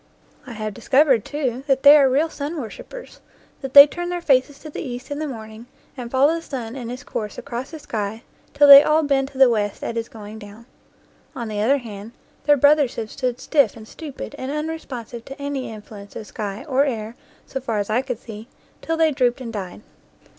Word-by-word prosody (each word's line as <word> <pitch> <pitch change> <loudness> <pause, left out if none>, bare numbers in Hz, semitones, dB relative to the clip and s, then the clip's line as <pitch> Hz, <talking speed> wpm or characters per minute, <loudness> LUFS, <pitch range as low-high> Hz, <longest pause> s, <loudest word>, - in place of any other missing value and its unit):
I 245 - -7
have 215 -1 -5
discovered, 265 0 +3
too, 265 -4 -3
that 270 -1 +1
they 285 +1 +10
are 275 -3 +5
real 285 +5 +2
sun 300 +3 -5
worshipers; 485 - -10 0.4
that 270 -1 -7
they 280 0 +13
turn 350 +4 -5
their 355 0 -2
faces 275 -3 +2
to 310 +1 -11
the - - -6
east 250 +2 -7
in 285 - -3
the 310 - -3
morning 220 -2 -9 0.3
and 245 -3 -7
follow 270 +5 +3
the 335 - -3
sun 250 -6 -6
in 245 -4 -6
his 250 +3 -7
course 210 -6 -5
across 255 0 -6
the 320 - -8
sky 220 -4 -5 0.3
till 290 0 +6
they 280 0 +12
all 305 +2 +2
bend 275 -2 +1
to 275 -1 -13
the 265 -1 +7
west 210 -4 -1
at 230 - -4
his 230 0 -3
going 215 0 -10
down. 210 +2 -13 0.7
On 235 -3 -5
the 210 -1 -3
other 265 +7 +3
hand, 220 -3 -9 0.3
their 290 0 +5
brothers 285 -1 +4
have 220 -2 -5
stood 250 -2 -3
stiff 275 -8 +2
and 220 -1 -12
stupid 300 0 -8
and 260 +1 -4
unresponsive 280 -7 -5
to 270 +2 -10
any 280 -3 -4
influence 210 -1 -11
of 220 - -7
sky 210 +4 -6
or 270 -1 +2
air 230 -4 -3 0.3
so 265 - -5
far 230 -4 -2
as 205 +1 -2
I 235 +4 +2
could 260 -3 -4
see, 220 -1 -10 0.3
till 325 0 -2
they 320 -1 +3
drooped 255 -3 +1
and 235 -3 -7
died. 195 -2 -6
255 Hz, 215 wpm, -22 LUFS, 225-285 Hz, 0.7 s, they